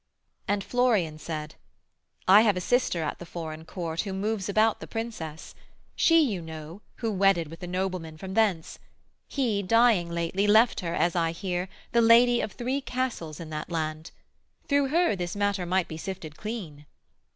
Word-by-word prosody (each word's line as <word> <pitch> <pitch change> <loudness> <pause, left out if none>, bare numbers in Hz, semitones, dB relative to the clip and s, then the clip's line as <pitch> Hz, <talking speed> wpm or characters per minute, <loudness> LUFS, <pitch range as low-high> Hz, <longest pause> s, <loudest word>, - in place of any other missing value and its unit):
And 200 -1 0
Florian 215 -12 +1
said: 155 -1 -5 0.7
'I 195 +3 +8
have 210 -4 +3
a - - -2
sister 180 -6 +1
at 150 - -3
the 175 - -8
foreign 160 -2 -7
court, 165 -2 -3
Who 195 -2 -5
moves 200 0 -2
about 215 +2 +3
the - - -8
Princess; 215 -10 -6 0.4
she, 330 0 +5
you 205 - -1
know, 160 +3 -9
Who 225 -2 -2
wedded 190 -5 +2
with 165 +2 -11
a 180 - -5
nobleman 180 -3 -3
from 190 +3 -7
thence: 195 -7 +1 0.5
He, 235 -8 0
dying 225 -3 +3
lately, 170 +4 -1
left 220 +3 +5
her, 170 -1 -3
as 175 +1 +1
I 165 -1 +1
hear, 180 0 -3 0.2
The 235 - +4
lady 240 +1 +6
of 210 - -4
three 255 +3 -2
castles 250 - -3
in 165 -2 -8
that 155 0 -5
land: 155 -1 -3 0.6
Through 285 -1 +3
her 335 - +2
this 175 -1 -4
matter 200 -3 0
might 185 0 +1
be 160 - -7
sifted 165 -4 -6
clean.' 170 -10 -7
190 Hz, 175 wpm, -27 LUFS, 165-225 Hz, 0.7 s, I